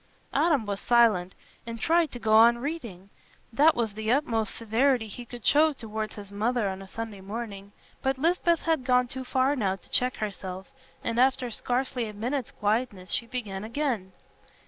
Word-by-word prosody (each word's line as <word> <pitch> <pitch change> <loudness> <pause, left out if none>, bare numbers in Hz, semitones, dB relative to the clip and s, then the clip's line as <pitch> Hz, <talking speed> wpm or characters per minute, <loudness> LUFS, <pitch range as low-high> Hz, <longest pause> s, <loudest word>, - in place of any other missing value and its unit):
Adam 295 -9 +2
was 200 -1 -3
silent, 220 -7 +3 0.3
and 230 0 -5
tried 330 +5 +3
to - - -6
go 220 -2 0
on 235 +2 +7
reading. 235 - -6 0.4
That 300 +6 +5
was 225 -3 -1
the 220 +1 -2
utmost 230 -6 0
severity 230 +1 +1
he 240 +4 -8
could 240 -1 -10
show 310 +1 +5
towards 220 -4 -5
his 205 -1 -9
mother 220 +2 0
on 190 0 -6
a 195 - -10
Sunday 220 -1 -6
morning. 200 -1 -6 0.3
But 265 0 0
Lisbeth 340 +2 +2
had 320 -5 0
gone 250 -1 +3
too 260 +1 -5
far 260 +2 +1
now 195 -7 0
to 195 - -19
check 250 0 +2
herself, 190 -2 -6 0.3
and 230 +1 -1
after 255 -1 +2
scarcely 245 +1 -1
a 210 - -7
minute's 245 +5 -2
quietness 205 -3 -2
she 235 - 0
began 210 -6 -4
again. 230 -5 -2
230 Hz, 175 wpm, -27 LUFS, 210-260 Hz, 0.4 s, on